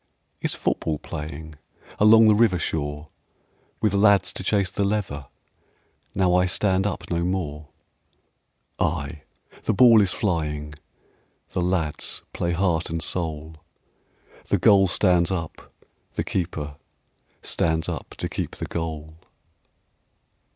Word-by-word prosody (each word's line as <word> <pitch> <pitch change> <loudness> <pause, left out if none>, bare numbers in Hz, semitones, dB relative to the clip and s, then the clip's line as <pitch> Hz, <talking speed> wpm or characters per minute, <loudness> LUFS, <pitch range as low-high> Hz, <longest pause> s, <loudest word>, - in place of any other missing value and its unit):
"Is - - -1
football 80 -2 -1
playing 75 +1 -8 0.4
Along 110 +1 +7
the 105 - +7
river 105 -4 +4
shore, 75 -2 -3 0.7
With 105 -3 +2
lads 100 -2 +4
to - - -5
chase 100 -2 +1
the 100 - -1
leather, 95 -9 -2 0.9
Now 90 -2 +3
I 90 0 +4
stand 95 +1 +1
up 90 -3 -5
no 85 0 0
more?" 80 -5 -3 1.1
Ay, 75 -1 -2 0.4
the - - 0
ball 115 -1 +7
is 95 -2 +2
flying, 75 -7 -2 0.8
The - - -2
lads 90 -4 -1
play 85 0 -1
heart 85 -2 0
and 85 0 -2
soul; 80 -2 -3 0.9
The - - +1
goal 95 -1 +5
stands 90 -2 +3
up, 85 -4 -5 0.4
the - - -1
keeper 75 -5 -3 0.7
Stands 80 -1 0
up - - -6
to - - -2
keep - - -4
the - - -5
goal. 80 -1 -5
85 Hz, 125 wpm, -24 LUFS, 80-95 Hz, 1.1 s, Along